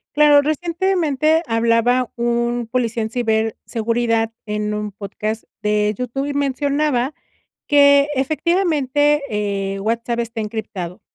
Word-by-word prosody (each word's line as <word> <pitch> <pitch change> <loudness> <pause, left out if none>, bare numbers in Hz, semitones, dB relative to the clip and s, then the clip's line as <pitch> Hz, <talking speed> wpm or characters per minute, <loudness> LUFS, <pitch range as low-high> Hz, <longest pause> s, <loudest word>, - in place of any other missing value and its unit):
Claro, 295 -1 +6
recientemente 320 -1 +1
hablaba 230 +1 +2
un 235 0 -1
policía 235 -3 0
en 220 - -3
ciberseguridad 225 0 -1
en 210 0 -2
un 210 -1 -4
podcast 215 +2 -5 0.2
de 210 0 +1
YouTube, 250 +3 -3
y 285 - -3
mencionaba 280 -1 0 0.6
que, 280 0 +6
efectivamente, 295 -1 +1
eh, 200 -2 -2
WhatsApp 230 +3 -2
está 230 -1 -3
encriptado. 210 -5 -5
240 Hz, 110 wpm, -20 LUFS, 220-285 Hz, 0.6 s, Claro